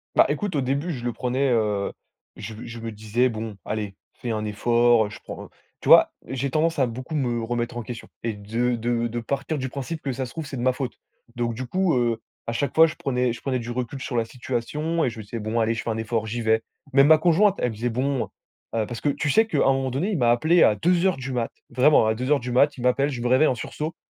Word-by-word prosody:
Bah, - - +7
écoute, 205 -6 -2
au 140 - +2
début, 140 +6 -1
je 125 -6 -5
le 120 - -1
prenais, 130 +3 0
heu, 105 -4 +1 0.4
je 110 +1 -7
me 110 - -9
je 120 0 -8
me 115 0 -5
disais: 110 +4 0
«Bon, 110 -2 -5
allez, 105 -2 -4 0.2
fais 120 - -5
un 110 -1 -2
effort», 115 +1 +3
je - - -10
prends - - -8 0.3
tu - - -7
vois? - - +8 0.2
J'ai 135 +1 -2
tendance 165 +3 +1
à 130 - +3
beaucoup 130 +6 -6
me 120 -5 0
remettre 120 +1 -2
en 120 - -3
question 115 0 -8
et 115 -1 -1
de 115 +4 -1
de 120 0 0
de 120 +1 -4
partir 140 +6 -2
du 130 -1 -3
principe 140 +5 -5
que 135 - -2
ça 130 +1 -3
se 120 - -10
trouve, 160 -2 -5
c'est 140 -1 -6
de - - -3
ma 130 +1 +3
faute. 130 -1 -5 0.4
Donc, 120 -1 -1
du 125 +3 -5
coup, 185 +3 +1
heu, 120 -2 +1 0.3
à - - 0
chaque 140 +4 -1
fois, 160 - +8
je 155 - -6
prenais 125 -4 0
je 120 - -9
prenais 130 -2 -1
du 120 0 -7
recul 125 +2 -4
sur 125 - -3
la 115 - +1
situation 130 +8 -2
et - - +1
je 115 - -9
me - - -6
disais: 115 +3 -6
«Bon 110 +2 -1
allez, 115 0 +1
je - - -4
fais - - -3
un 110 - -2
effort, 110 0 -1
j'y 120 +2 -3
vais». 110 0 +2 0.3
Même 140 +1 +6
ma 155 0 +8
conjointe, 180 +4 +4
elle 125 - 0
faisait: 115 +3 -2
«Bon», 130 +2 0 0.5
heu, 110 -1 +1
parce 120 -2 -6
que, - - -2
tu 145 +1 -1
sais 220 +10 +5
qu'à 220 - -2
un 135 - +4
moment 135 -1 -1
donné, 145 - -1
il 195 - 0
m'a 120 -4 +4
appelé 160 +8 +4
à 105 - +5
2:00 180 - +2
du 130 0 -5
mat, 120 -2 -1 0.2
vraiment 125 -1 +4
à 110 - +1
2:00 130 +5 +1
du 125 +1 -4
mat, 140 +4 +4
il 125 - -7
m'appelle, 130 +3 +2
je 125 -3 -5
me 120 - 0
réveille 130 +5 +5
en 130 - +1
sursaut 155 +6 -5
125 Hz, 265 wpm, -24 LUFS, 115-140 Hz, 0.5 s, vois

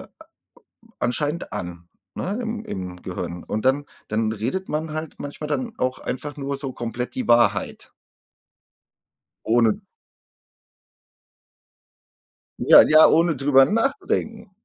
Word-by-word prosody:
a - - -12 0.9
anscheinend 150 +6 -2
an, 85 -1 -6 0.3
ne, 205 +6 -3
im 225 -1 -4
im 90 - -6
Gehirn. 90 -1 -6
Und 110 +3 -4
dann 140 +2 +2 0.2
dann 110 0 0
redet 120 - -3
man 155 +1 -3
halt 155 0 -5
manchmal 145 +1 -6
dann 230 +8 -2
auch 130 0 -1
einfach 145 +4 -5
nur 140 0 -3
so 135 -1 -4
komplett 120 +1 -5
die 255 -3 -3
Wahrheit. 105 -4 +2 1.5
Ohne 115 -1 +3 2.8
ja, - - +8
ja, 155 +1 +7
ohne 165 -1 +3
drüber 135 0 +5
nachzudenken. 225 - -1
140 Hz, 115 wpm, -23 LUFS, 110-170 Hz, 2.8 s, ja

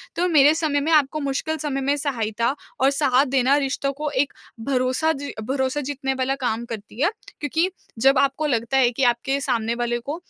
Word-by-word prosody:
तो 355 +2 +1
मेरे 295 -2 +6
समय 310 -3 0
में 310 +3 -1
आपको 300 0 +2
मुश्किल 280 +3 -2
समय 280 -2 -3
में 280 +2 +1
सहायता 235 -3 -1 0.3
और 270 +1 +5
साथ 275 -1 +3
देना 265 +1 +3
रिश्तों 275 0 -1
को 300 +2 -3
एक 280 0 0 0.3
भरोसा 260 +4 +1
जी 285 0 -6
भरोसा 265 +3 -1
जीतने 270 -1 -3
वाला 265 +1 -1
काम 235 -2 -1
करती 220 +1 -8
है 335 - +4 0.3
क्योंकि 320 +5 0 0.3
जब 270 +2 +4
आपको 275 +2 +1
लगता 235 0 0
है 250 -2 +4
कि 255 +3 -2
आपके 245 +3 +1
सामने 235 -4 0
वाले 240 0 -1
को 280 +6 -5
270 Hz, 190 wpm, -23 LUFS, 250-290 Hz, 0.3 s, मेरे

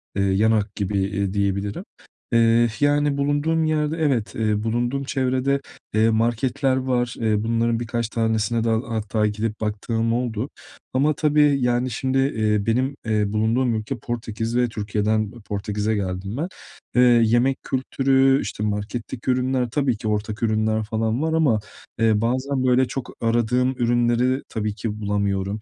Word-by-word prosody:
Eee, 100 - +1
yan 100 +3 +3
hak 105 -2 0
gibi, 100 -1 -1
eee, 100 0 -1
diyebilirim, 100 0 -1 0.5
eee, 115 0 +5
yani, 145 0 +2
bulunduğum 145 +3 +1
yerde 155 0 0
evet, 135 -9 0
eee, 110 -1 0
bulunduğum 120 +4 -1
çevrede, 135 +1 0 0.3
eee, 110 +1 +4
marketler 120 +4 +1
var. 125 -2 -1
Eee, 110 -1 +1
bunların 115 0 +1
birkaç 115 -1 -2
tanesine 110 0 0
de 115 - +1
hatta 110 -2 0
gidip 105 +1 -3
baktığım 115 +2 -1
oldu 120 +1 -2 0.4
ama 145 +4 +3
tabii, 150 -1 +3
yani, 125 +1 +1
şimdi, 130 +4 -1
eee, 110 -6 +1
benim, 130 +5 0
eee, 110 -1 +1
bulunduğum 115 +2 +1
ülke 110 +4 -3
Portekiz 115 0 -4
ve 125 -1 +2
Türkiye'den 105 0 -1
Portekiz'e 105 +2 -2
geldim 95 +3 -3
ben. 165 +4 -1 0.5
Eee, 125 - +5 0.2
yemek 120 +4 +2
kültürü, 135 +1 +2
işte, 105 - -4
marketteki 110 +4 -3
ürünler, 125 -1 0
tabii 135 -6 +1
ki 110 - -5
ortak 105 +1 -2
ürünler 110 0 +1
falan 110 +3 -1
var 160 0 0
ama, 140 -10 +3 0.4
eee, 110 -1 +3
bazen, 130 +3 0
böyle, 130 0 +3
çok 125 0 -5
aradığım 120 +2 +2
ürünleri 120 +1 +1
tabii 105 -1 -3
ki 110 -2 -4
bulamıyorum. 100 0 -1
115 Hz, 150 wpm, -23 LUFS, 110-130 Hz, 0.5 s, eee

